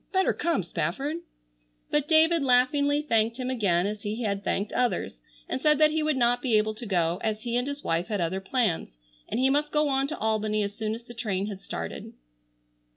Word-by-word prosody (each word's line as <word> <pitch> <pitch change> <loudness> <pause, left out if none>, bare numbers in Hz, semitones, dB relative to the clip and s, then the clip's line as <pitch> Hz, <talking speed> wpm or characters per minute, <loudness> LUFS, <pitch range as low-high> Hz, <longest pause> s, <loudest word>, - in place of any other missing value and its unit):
Better 380 -1 +2
come, 335 - 0
Spafford." 270 - -2 0.7
But 295 -1 +1
David 320 +1 +5
laughingly 285 +3 +3
thanked 225 -4 +1
him 255 -1 -3
again 190 -8 +1
as 210 0 -3
he 215 +4 -3
had 200 -2 -2
thanked 200 +1 -1
others, 250 -1 -1 0.3
and 260 - -3
said 300 -1 +4
that 305 0 +5
he 315 0 0
would 305 -2 +1
not 245 0 +2
be 235 -5 +3
able 215 +1 +1
to 230 +2 -8
go, 175 -3 +1
as 215 -1 -2
he 240 -1 -2
and 245 +2 +1
his 285 0 -5
wife 165 +1 0
had 210 -3 -2
other 180 +3 -1
plans, 195 - -1 0.3
and - - -1
he 265 +1 +3
must 295 +2 +1
go 300 -1 +2
on 270 0 +1
to 310 - -5
Albany 215 -1 0
as 200 0 -3
soon 215 +1 -3
as 230 - -10
the 240 - -11
train 200 -4 -2
had 200 -2 -6
started. - - -6
235 Hz, 215 wpm, -27 LUFS, 205-285 Hz, 0.7 s, David